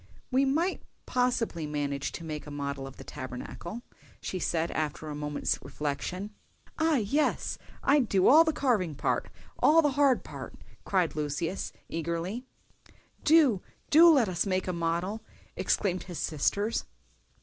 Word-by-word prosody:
"We 265 +2 +4
might 325 +8 +1 0.2
possibly 245 -10 0
manage 140 -2 -2
to 170 - -6
make 155 -2 -6
a - - -6
model 140 -1 -4
of 135 - -11
the - - -9
Tabernacle," 170 - -7 0.4
she 185 - -4
said, 170 -1 0
after 155 0 -3
a - - -4
moment's 150 0 -1
reflection. 165 +7 -4 0.5
"Ah, 320 -1 +3
yes! 275 +6 0 0.2
I'd 275 -4 +3
do 190 -2 +4
all 315 +4 +9
the 320 - +1
carving 215 - +1
part—all 310 - +1
the 295 - +3
hard 275 -2 +3
part," - - -8 0.3
cried 185 -5 +1
Lucius, 155 +4 -2 0.2
eagerly. 170 +8 -3 0.8
"Do, 295 - +5 0.3
do 330 +3 +9
let 275 -9 +5
us 180 0 0
make 185 -1 0
a 185 - -1
model!" 170 +5 -1 0.3
exclaimed 185 -3 0
his 175 -3 -7
sisters. 200 +8 0
185 Hz, 140 wpm, -29 LUFS, 155-255 Hz, 0.8 s, all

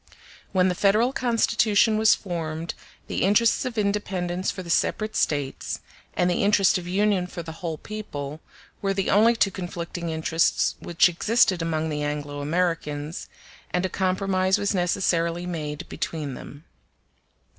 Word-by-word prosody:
When 185 -1 +3
the 185 - +1
Federal 215 +7 +3
Constitution 225 -3 +2
was 215 0 +5
formed, 165 -3 -4 0.3
the - - -3
interests 210 +4 +3
of 245 -3 -4
independence 190 -3 -1
for 185 - -4
the 170 - -10
separate 215 +5 0
States, 145 -3 -1 0.4
and 180 - +2
the 175 - +1
interest 200 -2 +4
of 175 - -9
union 195 0 +1
for 175 -1 -7
the 160 - -7
whole 165 -3 -3
people, 155 -8 -6 0.4
were 195 -1 0
the 195 -1 0
only 225 +4 +5
two 205 -3 +2
conflicting 175 -2 -5
interests 160 +1 +1
which 170 0 +3
existed 185 +1 +2
amongst 160 -1 -1
the 150 0 -2
Anglo 145 -1 -3
Americans, 155 -1 -2 0.4
and 180 +1 0
a - - -1
compromise 185 0 +1
was 200 - 0
necessarily 175 -2 0
made 150 -4 -4
between 150 -4 -4
them. 145 +4 -10
180 Hz, 145 wpm, -25 LUFS, 160-200 Hz, 0.4 s, was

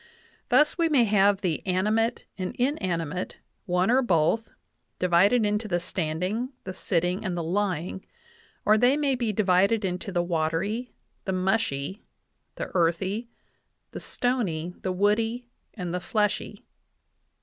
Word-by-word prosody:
Thus 300 +3 +4
we 335 -1 +3
may 275 -6 +5
have 200 -2 +3
the 175 -6 -1
animate 215 +6 +1
and 185 -2 -4
inanimate, 185 - -2 0.3
one 180 +3 +2
or 260 +2 +5
both, 200 +1 +2 0.5
divided 190 +6 +4
into 210 +1 0
the 175 -3 0
standing, 185 - -2
the 185 - -6
sitting, 180 0 -1
and 185 -4 -2
the 170 - -2
lying; 185 0 -1 0.6
or 215 +1 +5
they 250 +5 +4
may 285 -2 +1
be 240 -4 0
divided 200 +1 +3
into 180 +1 -3
the 175 -2 +1
watery, 175 +8 -1 0.3
the 190 - -1
mushy, 190 -3 -1 0.5
the - - -5
earthy, 190 +6 0 0.6
the - - -6
stony, 180 -10 -1
the 185 - -1
woody, 225 +5 +1 0.3
and 180 -5 -4
the 180 - -1
fleshy." 210 +2 -1
195 Hz, 135 wpm, -26 LUFS, 180-225 Hz, 0.6 s, may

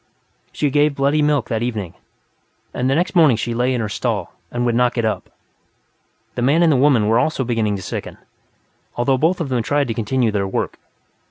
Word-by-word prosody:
She 145 -2 -1
gave 145 0 +2
bloody 140 +2 +1
milk, 145 -5 +1
that 115 -2 -1
evening, 110 -8 -3 0.8
and 125 +1 -1
the 135 - +2
next 175 +4 0
morning 155 -9 +5
she 120 +1 -3
lay 125 +2 +1
in 125 -2 -1
her 110 - -2
stall 100 -5 -3 0.2
and 120 0 -2
would 120 - +1
not 120 +1 +2
get 115 -2 0
up. 110 - -2 1.0
The - - -4
man 145 +7 +3
and 165 - +4
the - - +3
woman 130 -5 +3
were 115 +2 +3
also 135 +1 0
beginning 115 -4 0
to 95 - -6
sicken, - - -6 0.8
though 130 +2 +1
both 170 +5 +2
of 160 -5 -3
them 125 -2 0
tried 145 +4 0
to - - 0
continue 115 +1 0
their 100 -2 -1
work. 95 - -3
125 Hz, 205 wpm, -20 LUFS, 115-145 Hz, 1.0 s, morning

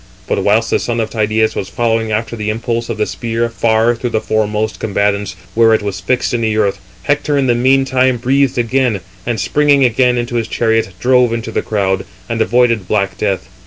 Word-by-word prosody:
But 100 - -1
whilst 110 +3 +2
the - - +2
son 120 -1 -2
of 110 - -2
Tydeus 110 0 0
was 95 - -4
following 115 -2 0
after 110 +2 -2
the 110 -1 -3
impulse 115 +1 -2
of 115 - -3
the 105 - +1
spear 115 +1 -2
far 115 0 +2
through 120 +1 -4
the 110 - 0
foremost 110 0 -1
combatants, 100 -2 -1 0.2
where 115 0 +4
it 110 - -2
was 100 -3 -3
fixed 125 -1 0
in 120 - 0
the 110 -1 0
earth, 100 -2 +1 0.2
Hector, 145 0 0
in 140 - +2
the 125 - +3
meantime, 130 0 +2
breathed 135 +2 +1
again, 120 -3 +1 0.3
and 120 -3 -1
springing 145 +3 +3
again 125 +1 +2
into 120 0 -2
his 115 - -1
chariot, 115 -3 0
drove 125 -2 +3
into 115 -1 -4
the - - -1
crowd, 95 -3 -1 0.2
and 115 -1 -2
avoided 115 -4 +2
black 100 -2 0
death. 100 -3 -1
115 Hz, 200 wpm, -15 LUFS, 110-120 Hz, 0.3 s, where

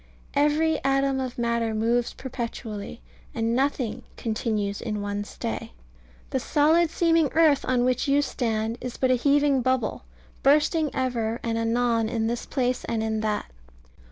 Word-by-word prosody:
Every 300 +2 +2
atom 275 0 +2
of 255 -1 -4
matter 235 -2 0
moves 235 +2 +1
perpetually; 230 - -6 0.3
and 225 +1 0
nothing 265 -3 0 0.2
"continues 215 -3 -2
in 210 -3 -3
one 205 0 -3
stay." 230 +2 -5 0.6
The 265 - +1
solid 315 +6 +3
seeming 330 -2 +2
earth 310 -3 +4
on 245 -1 +2
which 255 +1 +1
you 285 +1 +3
stand 225 -3 -2
is 250 -1 -5
but 260 -1 +2
a - - +6
heaving 280 +1 +3
bubble, 250 - 0 0.4
bursting 300 +2 +3
ever 235 -3 -1
and 230 -1 -1
anon 230 0 +1
in 225 -1 -1
this 235 +1 -2
place 255 -2 -1
and 225 -1 -1
in 220 0 -1
that. 215 - -2
245 Hz, 150 wpm, -25 LUFS, 225-275 Hz, 0.6 s, a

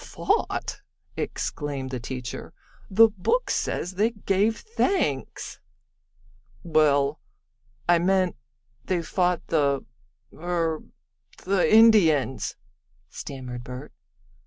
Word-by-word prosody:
"Fought!" 420 -2 -1 0.3
exclaimed 140 -3 -3
the 130 - -3
teacher. 125 0 -6 0.3
"The 225 +3 +7
book 220 - 0
says 180 - -1
they 205 +5 +2
gave 210 0 0
thanks." 380 - -1 1.0
"Well, 150 -3 +3 0.7
I 175 -1 +5
meant 185 +1 +2 0.5
they 180 -2 -1
fought 180 0 0
the 140 -4 +1 0.5
er 165 -2 -1 0.6
the 190 -1 +2
Indians," 195 - +5 0.6
stammered 125 -3 -7
Bert. 125 +4 -8
170 Hz, 85 wpm, -25 LUFS, 140-200 Hz, 1.0 s, The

